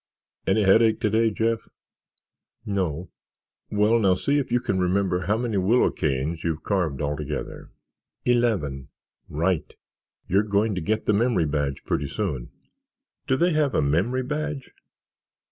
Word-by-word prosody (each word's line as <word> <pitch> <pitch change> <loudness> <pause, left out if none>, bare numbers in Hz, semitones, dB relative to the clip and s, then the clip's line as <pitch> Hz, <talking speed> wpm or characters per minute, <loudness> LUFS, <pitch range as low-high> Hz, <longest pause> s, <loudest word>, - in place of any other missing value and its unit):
Any 110 - +3
headache 110 +3 +4
today, 110 +2 +2
Jeff?" 115 +1 -1 1.0
"No." 90 -4 -2 0.6
"Well, 105 +3 +3
now 95 -4 +3
see 140 +10 +1
if 135 - -4
you 120 - +3
can 95 -5 -1
remember 90 0 +1
how 105 +2 +2
many 115 -3 -1
willow 105 +7 +3
canes 75 +3 -2
you've 80 -2 -2
carved 85 -9 -1
altogether." 75 0 -4 0.6
"Eleven." 105 - +1 0.4
"Right. 80 0 -1 0.6
You're 95 +3 +3
going 105 +1 +1
to 90 - -3
get 110 +6 -1
the 105 - +3
memory 110 -5 +2
badge 70 -2 -2
pretty 70 - -1
soon." 75 - -3 0.8
"Do 130 - +2
they 175 +2 +2
have 150 -3 +1
a - - +3
memory 95 - +1
badge?" 150 0 -4
100 Hz, 140 wpm, -25 LUFS, 80-115 Hz, 1.0 s, headache